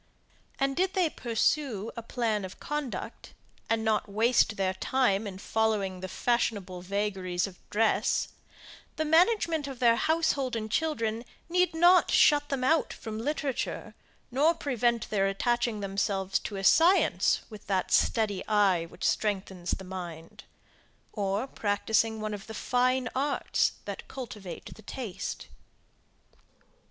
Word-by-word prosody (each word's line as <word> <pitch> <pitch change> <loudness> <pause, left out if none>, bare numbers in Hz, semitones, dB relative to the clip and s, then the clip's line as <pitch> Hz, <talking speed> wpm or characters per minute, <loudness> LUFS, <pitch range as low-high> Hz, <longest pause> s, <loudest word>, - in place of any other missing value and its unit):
And 275 0 0
did 375 +2 0
they 355 -5 +2
pursue 230 -2 0
a 230 - -5
plan 225 -3 -1
of 190 0 -8
conduct, 295 -3 -5 0.3
and 225 0 +1
not 215 -2 +1
waste 220 +1 +2
their 190 -1 0
time 210 0 +1
in 190 -2 -7
following 205 -3 0
the 185 - -5
fashionable 200 -3 -1
vagaries 190 -2 -1
of 190 -3 -10
dress, 220 +1 +1 0.7
the 315 - -1
management 330 -2 +3
of 270 -2 -7
their 235 -1 +4
household 290 -6 +1
and 220 -1 -4
children 230 -7 -1 0.3
need 360 -1 +2
not 350 +2 +5
shut 290 -1 +4
them 270 -2 -2
out 315 +5 +2
from 220 -1 -6
literature, 280 +1 -3 0.4
nor 300 +7 +3
prevent 240 -7 0
their 195 -2 +2
attaching 235 +2 0
themselves 195 -1 -1
to 205 - -6
a 195 - -4
science, 340 - +4
with 215 -1 -11
that 190 -2 0
steady 210 -4 +2
eye 195 -6 +3
which - - -12
strengthens 190 -4 -1
the 190 - -2
mind, 175 -3 -8 0.7
or 200 +2 -1
practising 220 -1 0
one 215 0 -3
of 200 0 -7
the 220 - -7
fine 250 +2 +1
arts 280 +2 +1
that - - -6
cultivate 210 -8 -8
the - - -15
taste. 205 -4 -6
220 Hz, 135 wpm, -29 LUFS, 195-265 Hz, 0.7 s, not